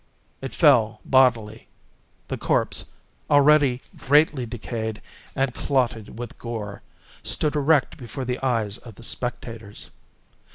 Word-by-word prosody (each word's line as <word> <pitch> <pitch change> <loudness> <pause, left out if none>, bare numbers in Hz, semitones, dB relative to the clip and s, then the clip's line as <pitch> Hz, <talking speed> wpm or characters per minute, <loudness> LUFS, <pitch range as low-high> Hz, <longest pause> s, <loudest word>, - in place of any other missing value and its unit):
It 135 - -5
fell 115 -9 +4
bodily. 115 -5 +2 0.6
The - - -3
corpse, - - 0 0.4
already 145 -3 +4
greatly 145 -2 +2
decayed 110 -1 -5 0.4
and 135 -2 0
clotted 120 -7 -1
with 120 -1 -8
gore, 110 -4 -6 0.4
stood 150 -1 +1
erect 150 -1 +2
before 130 +2 -6
the 125 0 -3
eyes 115 -6 0
of 115 -4 -13
the 120 - -13
spectators. 115 -3 -4
125 Hz, 115 wpm, -24 LUFS, 110-135 Hz, 0.6 s, fell